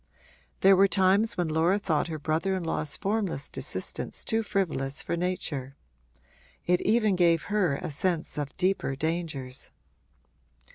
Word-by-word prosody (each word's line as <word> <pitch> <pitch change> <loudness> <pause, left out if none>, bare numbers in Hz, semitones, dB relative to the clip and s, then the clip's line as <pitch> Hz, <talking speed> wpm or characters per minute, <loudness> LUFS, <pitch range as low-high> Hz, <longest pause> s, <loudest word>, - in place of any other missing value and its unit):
There 195 0 +7
were 195 +1 +6
times 195 +4 +2
when 175 -2 +1
Laura 160 +5 +2
thought 170 -7 0
her 160 -2 -4
brother 160 +6 0
in 185 - -3
law's 155 -2 -2
formless 200 -8 -2
desistence - - -4
too 225 -1 +1
frivolous 155 -10 -1
for - - -2
nature: 155 -7 -3 0.9
it 180 0 +2
even 215 -2 +3
gave 170 -3 +3
her 180 -9 +2
a 165 +3 -5
sense 170 +2 -1
of 145 -1 -4
deeper 185 -7 +1
dangers. 150 -4 -3
175 Hz, 140 wpm, -28 LUFS, 155-195 Hz, 0.9 s, There